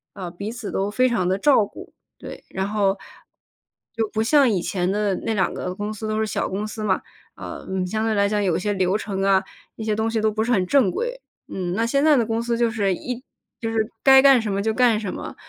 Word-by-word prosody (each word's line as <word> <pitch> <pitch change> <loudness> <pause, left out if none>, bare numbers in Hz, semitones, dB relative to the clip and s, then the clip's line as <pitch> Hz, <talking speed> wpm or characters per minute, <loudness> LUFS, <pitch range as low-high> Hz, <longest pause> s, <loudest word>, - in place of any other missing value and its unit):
呃， 185 -4 -6
彼 200 +5 -6
此 235 -3 -6
都 195 +1 -1
非 255 +4 +2
常 200 -7 0
地 190 +1 +1
照 245 -2 +4
顾， - - -12 0.3
对， - - -10
然 190 0 -3
后， 200 -2 +1 1.0
就 225 -1 -1
不 220 0 +1
像 275 +1 +4
以 190 -5 0
前 180 -1 -1
的 205 0 0
那 225 - -2
两 190 -3 0
个 180 0 -4
公 205 +2 -4
司 215 +1 -6
都 215 0 -1
是 - - +1
小 215 - -2
公 200 +3 -3
司 215 0 -5
嘛， 190 - +1 0.3
呃， - - -8
嗯， 190 -1 -1
相 215 +4 -2
对 225 - +1
来 200 0 +3
讲 210 0 0
有 185 -5 +1 0.2
流 190 +2 +2
程 195 -3 -4
啊， 195 -1 +3 0.3
那 220 - -7
些 215 - 0
东 220 +1 0
西 225 -1 -1
都 215 - +2
不 215 +1 -2
是 240 +3 +1
很 190 -5 +2
正 255 0 +3
规。 - - -3 0.3
嗯， 180 -2 -3
那 225 +3 0
现 275 +4 +1
在 310 -1 +6
的 240 -4 +2
公 225 +1 -1
司 235 0 -1
就 235 -1 +2
是 200 -5 0
一 250 +5 -5 0.4
就 225 - -3
是 225 0 -1
该 265 -1 +8
干 270 -3 +6
什 220 - -3
么 200 - 0
就 220 +1 0
干 240 -3 +3
什 205 -4 -4
么， - - -7
215 Hz, 265 characters per minute, -23 LUFS, 195-230 Hz, 1.0 s, 该